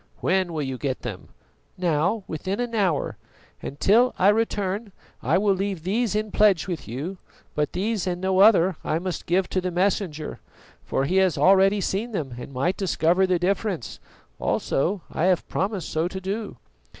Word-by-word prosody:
"When 185 Hz, -1 st, +1 dB
will 155 Hz, -2 st, -2 dB
you 130 Hz, -2 st, -4 dB
get 135 Hz, -3 st, -3 dB
them?" 105 Hz, -7 st, -6 dB, 0.5 s
"Now, 180 Hz, +4 st, +1 dB
within 190 Hz, +7 st, -4 dB
an 240 Hz, -1 st, -2 dB
hour. 190 Hz, -9 st, 0 dB, 0.4 s
And 140 Hz, -, -7 dB
till 235 Hz, +5 st, +4 dB
I 190 Hz, -, +5 dB
return 205 Hz, -1 st, 0 dB, 0.3 s
I -, -, +2 dB
will 200 Hz, +1 st, +3 dB
leave 190 Hz, -3 st, -3 dB
these 210 Hz, +4 st, 0 dB
in 215 Hz, 0 st, -1 dB
pledge 205 Hz, -5 st, +3 dB
with 175 Hz, -4 st, -5 dB
you; 150 Hz, -, -5 dB, 0.3 s
but 150 Hz, -1 st, -1 dB
these 205 Hz, 0 st, -1 dB
and 175 Hz, -1 st, -1 dB
no 190 Hz, 0 st, +1 dB
other 190 Hz, -4 st, +6 dB
I 155 Hz, -, 0 dB
must 180 Hz, +1 st, -4 dB
give 180 Hz, +2 st, +2 dB
to 185 Hz, -, 0 dB
the 185 Hz, -, -2 dB
Messenger, 175 Hz, -4 st, -1 dB, 0.4 s
for 135 Hz, -, -1 dB
he 185 Hz, +6 st, +1 dB
has 190 Hz, -3 st, +3 dB
already 195 Hz, +2 st, +5 dB
seen 220 Hz, +5 st, -2 dB
them 140 Hz, -10 st, -3 dB
and 130 Hz, -, -8 dB
might 140 Hz, +8 st, -1 dB
discover 185 Hz, -1 st, +2 dB
the 185 Hz, -1 st, +2 dB
difference; 185 Hz, -, -2 dB, 0.4 s
also 175 Hz, +6 st, 0 dB
I 165 Hz, -, 0 dB
have 185 Hz, -3 st, +2 dB
promised 195 Hz, -1 st, -2 dB
so 160 Hz, +2 st, 0 dB
to 190 Hz, +1 st, -5 dB
do." 200 Hz, -, -4 dB
185 Hz, 175 wpm, -24 LUFS, 165-200 Hz, 0.5 s, other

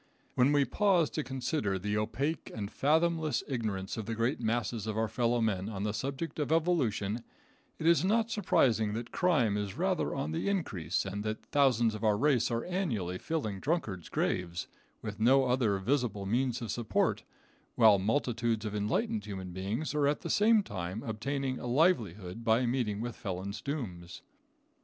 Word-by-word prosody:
When 130 Hz, +3 st, +4 dB
we 145 Hz, -1 st, +4 dB
pause 180 Hz, -, +2 dB
to 155 Hz, -, -2 dB
consider 125 Hz, -5 st, -1 dB
the 105 Hz, +3 st, -2 dB
opaque 125 Hz, +9 st, -2 dB
and 105 Hz, -1 st, -4 dB
fathomless 160 Hz, -1 st, +1 dB
ignorance 110 Hz, -8 st, -3 dB
of 110 Hz, -2 st, -5 dB
the 115 Hz, -, -2 dB
great 115 Hz, +5 st, 0 dB
masses 115 Hz, -1 st, -1 dB
of 110 Hz, 0 st, -2 dB
our 110 Hz, 0 st, +1 dB
fellow 120 Hz, +1 st, +1 dB
men 100 Hz, -3 st, 0 dB
on 100 Hz, -3 st, -4 dB
the 105 Hz, -1 st, -1 dB
subject 135 Hz, +9 st, -4 dB
of 150 Hz, -, -1 dB
evolution, 125 Hz, -, +1 dB, 0.5 s
it -, -, -5 dB
is 170 Hz, -1 st, +5 dB
not 225 Hz, +4 st, +2 dB
surprising 115 Hz, -, +2 dB
that 115 Hz, +2 st, -5 dB
crime 135 Hz, -, +2 dB
is 100 Hz, -2 st, -4 dB
rather -, -, 0 dB
on 75 Hz, -, -2 dB
the 80 Hz, -, -1 dB
increase, 100 Hz, -, -1 dB
and 100 Hz, +2 st, -4 dB
that 110 Hz, 0 st, -4 dB
thousands 120 Hz, -6 st, +3 dB
of 110 Hz, -, -6 dB
our 105 Hz, -2 st, +3 dB
race 135 Hz, -1 st, +3 dB
are 115 Hz, -1 st, -2 dB
annually 115 Hz, -, -2 dB
filling 110 Hz, -12 st, -3 dB
drunkards' 110 Hz, -, -2 dB
graves, 90 Hz, -1 st, -1 dB, 0.4 s
with 105 Hz, -1 st, -5 dB
no 130 Hz, +4 st, +5 dB
other 125 Hz, -5 st, +2 dB
visible 105 Hz, -2 st, -1 dB
means 120 Hz, +3 st, 0 dB
of 110 Hz, -, -3 dB
support, 120 Hz, -3 st, 0 dB, 0.5 s
while 110 Hz, -4 st, +6 dB
multitudes 115 Hz, 0 st, 0 dB
of 105 Hz, -, -3 dB
enlightened 210 Hz, -, -1 dB
human 95 Hz, -3 st, -6 dB
beings 105 Hz, -, -3 dB
are 150 Hz, -1 st, +2 dB
at 145 Hz, -, 0 dB
the -, -, -3 dB
same 215 Hz, 0 st, +4 dB
time 95 Hz, -, -5 dB
obtaining 130 Hz, +4 st, -2 dB
a -, -, -5 dB
livelihood 115 Hz, -, +1 dB
by 115 Hz, +2 st, +3 dB
meeting 120 Hz, -4 st, -1 dB
with 120 Hz, -1 st, -4 dB
felons' 95 Hz, +2 st, -5 dB
dooms. 90 Hz, -, -5 dB
115 Hz, 170 wpm, -31 LUFS, 105-140 Hz, 0.5 s, while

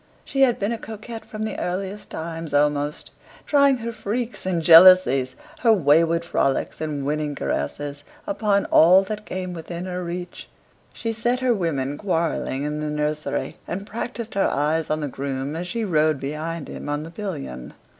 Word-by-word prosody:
She 270 Hz, -, -1 dB
had 250 Hz, -3 st, +5 dB
been 200 Hz, +3 st, -1 dB
a 230 Hz, -, -3 dB
coquette 225 Hz, +1 st, -8 dB
from 215 Hz, 0 st, -6 dB
the 220 Hz, -, -4 dB
earliest 190 Hz, +3 st, -4 dB
times 165 Hz, -2 st, -5 dB
almost, 145 Hz, 0 st, 0 dB, 0.3 s
trying 280 Hz, -2 st, +4 dB
her 235 Hz, 0 st, -4 dB
freaks 230 Hz, 0 st, -4 dB
and 180 Hz, -2 st, +1 dB
jealousies, 165 Hz, -6 st, +7 dB, 0.2 s
her 230 Hz, -, +4 dB
wayward 165 Hz, -2 st, +3 dB
frolics 135 Hz, -1 st, 0 dB
and 150 Hz, -3 st, -3 dB
winning 150 Hz, 0 st, -1 dB
caresses, 145 Hz, -, -3 dB, 0.2 s
upon 210 Hz, -10 st, +1 dB
all 180 Hz, +4 st, +7 dB
that 210 Hz, +2 st, -6 dB
came 185 Hz, -1 st, -4 dB
within 170 Hz, +1 st, -6 dB
her 180 Hz, -1 st, -4 dB
reach; 175 Hz, +1 st, -6 dB, 0.4 s
she 230 Hz, -1 st, -4 dB
set 240 Hz, +3 st, 0 dB
her 255 Hz, -2 st, +3 dB
women 145 Hz, -, -2 dB
quarrelling 165 Hz, -7 st, -1 dB
in 150 Hz, +1 st, -2 dB
the 150 Hz, 0 st, -2 dB
nursery, 150 Hz, 0 st, -2 dB
and 195 Hz, +3 st, -4 dB
practised 230 Hz, +1 st, -5 dB
her 195 Hz, -, +2 dB
eyes 155 Hz, +3 st, 0 dB
on 155 Hz, 0 st, 0 dB
the 145 Hz, -, -2 dB
groom 135 Hz, +1 st, -4 dB
as 175 Hz, +2 st, -4 dB
she 225 Hz, +5 st, -2 dB
rode 155 Hz, -5 st, +2 dB
behind 155 Hz, +3 st, -4 dB
him -, -, -7 dB
on 145 Hz, +1 st, -2 dB
the 165 Hz, -, -9 dB
pillion. 150 Hz, -, -6 dB
170 Hz, 170 wpm, -23 LUFS, 150-210 Hz, 0.4 s, jealousies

